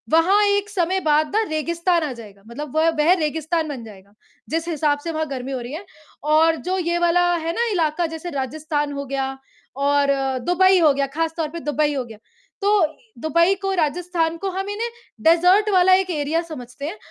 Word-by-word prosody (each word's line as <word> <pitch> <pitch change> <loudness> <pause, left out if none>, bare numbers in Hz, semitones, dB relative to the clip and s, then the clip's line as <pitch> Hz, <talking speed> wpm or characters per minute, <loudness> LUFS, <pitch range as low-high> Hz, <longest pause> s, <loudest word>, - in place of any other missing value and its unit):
वहाँ 340 +6 +4
एक 405 0 +1
समय 375 -1 0
बाद 305 0 +3
ना 440 - +4
रेगिस्तान 335 +2 0
आ 300 - -2
जाएगा। 210 -4 -13
मतलब 280 +4 -7
वह 320 +1 +4
वे 305 +4 +5
रेगिस्तान 320 0 -1
बन 265 -5 -6
जाएगा। 200 -2 -14 0.4
जिस 325 +2 -2
हिसाब 300 -3 0
से 335 - -3
वहाँ 315 0 -2
गर्मी 265 -1 -5
हो 260 - -2
रही 240 +3 -7
है 345 +6 -7 0.4
और 315 +2 +4
जो 375 +1 0
ये 345 -1 0
वाला 345 +1 +3
है 330 0 -2
ना 475 - +1
इलाक़ा 335 -2 0
जैसे 320 +2 -6
राजस्थान 290 +2 -2
हो 280 0 -4
गया 270 0 -3 0.4
और 280 +1 +2 0.4
दुबई 375 +1 +4
हो 310 -4 +5
गया, 275 0 -1
ख़ास 320 +4 -2
तौर 320 -2 -1
पे 335 +2 -7
दुबई 295 -1 0
हो 265 -3 -2
गया। 225 -2 -12 0.4
तो 405 -3 +4 0.4
दुबई 335 +4 +3
को, 390 0 -1
राजस्थान 335 0 0
को 390 +3 -3
हम 385 +2 -4
इन्हें 440 +3 -3 0.3
डेज़र्ट 360 +6 +5
वाला 370 0 +5
एक 375 0 +3
एरिया 305 +1 0
समझते 260 -4 -8
हैं। 340 +8 -5
320 Hz, 195 wpm, -21 LUFS, 290-355 Hz, 0.4 s, वे